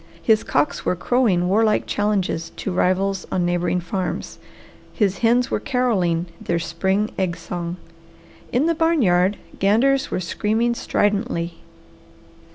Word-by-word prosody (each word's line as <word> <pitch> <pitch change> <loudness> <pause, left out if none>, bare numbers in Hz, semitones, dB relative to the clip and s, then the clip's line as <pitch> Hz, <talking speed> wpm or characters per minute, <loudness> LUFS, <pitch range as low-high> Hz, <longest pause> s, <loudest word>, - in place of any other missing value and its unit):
His 215 +4 +3
cocks 285 -1 0
were - - 0
crowing 185 -3 +1
warlike 215 +3 +2
challenges 195 -5 -1
to 195 - -4
rivals 185 +2 0
on 180 -2 +1
neighbouring 175 0 0
farms. 180 +1 -4 0.5
His 200 -3 0
hens 240 +3 +2
were - - +1
carolling 190 -10 0 0.2
their 170 - 0
spring 190 +5 -1
egg 180 -2 -1
song. 170 +1 -5 0.7
In 255 +5 +2
the 335 - +3
barn 325 -3 +2
yard 180 +1 +3 0.2
ganders 250 +8 +3
were - - -2
screaming 220 +6 0
stridently. 205 -6 -1
195 Hz, 130 wpm, -22 LUFS, 175-230 Hz, 0.7 s, His